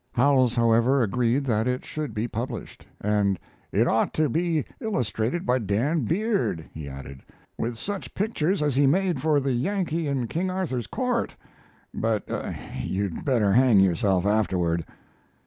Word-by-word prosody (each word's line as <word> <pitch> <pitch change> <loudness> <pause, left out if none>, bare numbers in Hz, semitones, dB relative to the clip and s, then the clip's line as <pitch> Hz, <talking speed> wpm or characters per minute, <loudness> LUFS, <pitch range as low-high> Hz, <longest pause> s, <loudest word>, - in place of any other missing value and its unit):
Howells, 130 -2 +3
however, 115 +3 +4
agreed 120 +5 +1
that 115 -3 +1
it 125 0 -1
should 150 -7 -5
be 110 +3 -1
published, 120 +1 -6
and 100 -2 +1 0.3
"it - - +3
ought - - +1
to 155 -2 +2
be 165 +1 0
illustrated 150 - -1
by 125 +1 +2
Dan 120 - 0
Beard," 195 - 0
he 75 -3 -7
added, 70 0 -9 0.3
"with 115 0 -3
such 200 - -5
pictures 190 -5 0
as 145 -3 +1
he 140 0 +4
made 175 -1 +1
for 155 -2 +3
the 135 -1 -1
Yankee 165 +3 -1
in 135 -3 0
King 170 +10 -2
Arthur's 175 -10 -2
Court, 250 -2 -1 0.6
but 110 -2 -1 0.5
you'd 95 -2 -2
better 115 -8 +3
hang 125 -3 +5
yourself 95 0 +2
afterward." 90 -6 +1
125 Hz, 145 wpm, -25 LUFS, 105-155 Hz, 0.6 s, hang